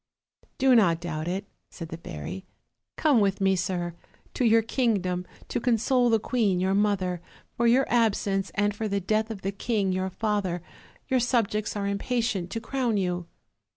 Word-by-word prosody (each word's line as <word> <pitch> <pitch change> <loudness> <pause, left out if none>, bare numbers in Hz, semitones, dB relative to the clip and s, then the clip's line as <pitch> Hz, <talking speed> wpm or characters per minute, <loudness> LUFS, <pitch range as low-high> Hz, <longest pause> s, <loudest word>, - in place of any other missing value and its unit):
"Do 265 -1 +4
not 175 -8 +4
doubt 165 -2 -4
it," 190 +3 -2 0.2
said 165 -2 -8
the 165 - -6
fairy; 180 +2 -7 0.5
"come 295 -6 +3
with 200 -2 +1
me, 195 -1 +3
sir, 175 -1 -2 0.4
to - - -1
your 225 -1 +5
kingdom 195 -7 0 0.2
to - - -1
console 245 +1 +2
the 225 - +4
queen 215 -6 +1
your 190 +1 +1
mother, 195 -4 +1 0.3
for 235 - +2
your 255 +3 +4
absence, 200 -4 +1
and 205 0 +1
for 220 +1 -2
the 200 -1 0
death 215 +3 0
of 210 -4 -7
the 195 - -1
king 200 -1 -1
your 185 +1 -1
father; 195 -4 -1 0.4
your 260 -1 +2
subjects 225 -4 0
are 205 -1 -2
impatient 200 -2 -1
to 225 - -3
crown 240 -1 -1
you." 180 -2 -1
200 Hz, 170 wpm, -27 LUFS, 185-230 Hz, 0.5 s, your